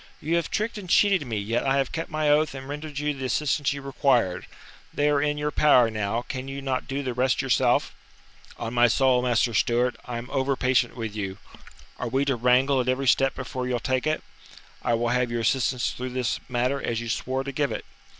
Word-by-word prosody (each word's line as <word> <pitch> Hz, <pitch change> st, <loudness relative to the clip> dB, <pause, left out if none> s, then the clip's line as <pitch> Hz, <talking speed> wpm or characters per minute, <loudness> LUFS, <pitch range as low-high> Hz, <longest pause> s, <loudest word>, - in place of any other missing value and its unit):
"You 160 Hz, +3 st, -1 dB
have 170 Hz, -, -2 dB
tricked 215 Hz, +1 st, -2 dB
and 185 Hz, -3 st, -10 dB
cheated 190 Hz, -7 st, +3 dB
me, 110 Hz, -2 st, -2 dB
yet 110 Hz, +4 st, -1 dB
I 135 Hz, 0 st, +2 dB
have 135 Hz, -1 st, 0 dB
kept 165 Hz, -, -4 dB
my 155 Hz, -2 st, -1 dB
oath 150 Hz, 0 st, +3 dB
and 135 Hz, 0 st, -8 dB
rendered 150 Hz, 0 st, -6 dB
you 150 Hz, 0 st, 0 dB
the 135 Hz, -2 st, -6 dB
assistance 145 Hz, +3 st, 0 dB
you 140 Hz, 0 st, -5 dB
required. 130 Hz, -9 st, +1 dB, 0.4 s
They 145 Hz, 0 st, +1 dB
are 145 Hz, -1 st, +2 dB
in 150 Hz, 0 st, 0 dB
your 150 Hz, 0 st, -1 dB
power 125 Hz, -6 st, +5 dB
now, 110 Hz, +2 st, -2 dB
can 130 Hz, 0 st, -6 dB
you 135 Hz, 0 st, -5 dB
not 135 Hz, -2 st, -2 dB
do 140 Hz, +1 st, -3 dB
the 130 Hz, -2 st, -2 dB
rest 130 Hz, +2 st, +1 dB
yourself?" 135 Hz, -2 st, +2 dB, 0.6 s
"On 115 Hz, -, -5 dB
my 120 Hz, 0 st, +5 dB
soul, 130 Hz, +1 st, +3 dB
Master 120 Hz, -1 st, +1 dB
Stewart, 120 Hz, +4 st, +2 dB
I 120 Hz, -2 st, -4 dB
am 120 Hz, +1 st, -6 dB
over 135 Hz, +1 st, +1 dB
patient 130 Hz, -2 st, +1 dB
with 110 Hz, -3 st, -5 dB
you! 95 Hz, -2 st, -4 dB, 0.6 s
Are 125 Hz, -, -2 dB
we 135 Hz, +3 st, +1 dB
to 135 Hz, -2 st, +1 dB
wrangle 125 Hz, +3 st, +3 dB
at 125 Hz, -, -2 dB
every 130 Hz, +1 st, 0 dB
step 135 Hz, +2 st, +3 dB
before 130 Hz, 0 st, -4 dB
you'll 125 Hz, -1 st, -1 dB
take 130 Hz, +4 st, -1 dB
it? 155 Hz, -, -1 dB, 0.6 s
I 120 Hz, -1 st, +1 dB
will 120 Hz, +1 st, 0 dB
have 125 Hz, 0 st, +1 dB
your 120 Hz, 0 st, -2 dB
assistance 125 Hz, +1 st, +1 dB
through 130 Hz, +1 st, -5 dB
this 125 Hz, -2 st, -1 dB
matter 125 Hz, +3 st, 0 dB
as 115 Hz, -1 st, -2 dB
you 120 Hz, -, -5 dB
swore 130 Hz, +3 st, -2 dB
to 140 Hz, -, -5 dB
give 140 Hz, +1 st, -1 dB
it. -, -, -5 dB
130 Hz, 225 wpm, -25 LUFS, 120-140 Hz, 0.6 s, power